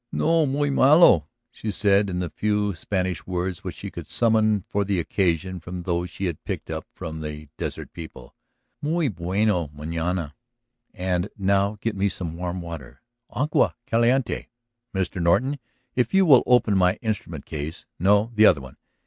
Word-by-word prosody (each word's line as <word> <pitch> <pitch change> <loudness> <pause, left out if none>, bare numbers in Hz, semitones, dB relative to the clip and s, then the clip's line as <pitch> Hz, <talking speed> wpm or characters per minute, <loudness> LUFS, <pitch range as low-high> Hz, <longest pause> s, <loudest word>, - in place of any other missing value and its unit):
"No 165 -1 +2
muy 145 +1 0
malo," 135 - +6 0.2
she 110 - -6
said 100 0 +2
in 90 - -3
the 90 -1 -3
few 105 -1 0
Spanish 90 0 -3
words 90 -1 -3
which - - -5
she - - -7
could - - -8
summon 110 -4 +2
for 100 - 0
the 100 -2 0
occasion 90 +1 0
from 90 +1 -7
those 85 0 -1
she 95 +4 -5
had 85 -4 -4
picked - - -5
up - - -5
from 80 0 -7
the 75 -1 -7
desert - - -5
people. 65 -7 -10 0.5
"Muy 155 0 +1
bueno 90 -1 0
manana. 80 +2 -3 0.6
And 90 -1 -1
now 100 +1 +1
get 115 -2 -1
me 100 +1 +1
some 85 -3 -5
warm 90 +1 -4
water... 70 -7 -9 0.3
agua 145 +4 +1
caliente. 120 +2 +1 0.4
Mr. 95 -1 -2
Norton, 130 +12 +2 0.4
if 125 +9 +1
you 195 0 +6
will 135 -7 +8
open 120 -4 +4
my 90 -1 +4
instrument 110 -2 -3
case... 75 +1 -6
no; 100 +5 +3
the 110 -1 +6
other 70 - +5
one. 65 -1 -12
95 Hz, 165 wpm, -24 LUFS, 85-110 Hz, 0.6 s, will